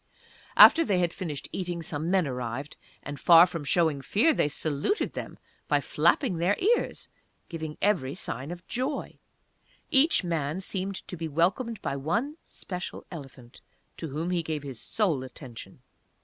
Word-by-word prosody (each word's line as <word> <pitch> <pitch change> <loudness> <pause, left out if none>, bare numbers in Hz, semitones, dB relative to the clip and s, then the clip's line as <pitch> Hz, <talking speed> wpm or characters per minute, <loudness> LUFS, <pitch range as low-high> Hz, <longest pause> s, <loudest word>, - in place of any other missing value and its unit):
After 330 - +9
they 200 - +1
had 175 -2 +1
finished 155 -7 -5
eating 175 -2 -3
some 155 +1 -3
men 185 -2 +3
arrived, 125 +2 -4 0.3
and 145 0 -6
far 170 0 +8
from 170 -4 -5
showing 155 -2 +1
fear, 230 - +3
they - - +2
saluted 150 - -1
them - - -6 0.3
by - - +3
flapping 240 - +2
their 175 +5 +2
ears 465 +5 0 0.4
giving 160 -3 -6
every 175 -10 +1
sign 135 -6 -5
of 175 +1 -8
joy. 260 +5 -3 0.7
Each 290 -4 +4
man 165 -1 -1
seemed 190 0 -3
to - - -5
be 165 -1 -4
welcomed 190 - 0
by - - -1
one 230 - -1
special 180 0 -7
elephant 135 -6 -11 0.4
to 165 - -4
whom 160 +5 -3
he 175 -1 +1
gave 155 -2 -4
his 135 -4 -7
sole 170 -12 0
attention. 130 -2 -11
170 Hz, 155 wpm, -28 LUFS, 145-195 Hz, 0.7 s, After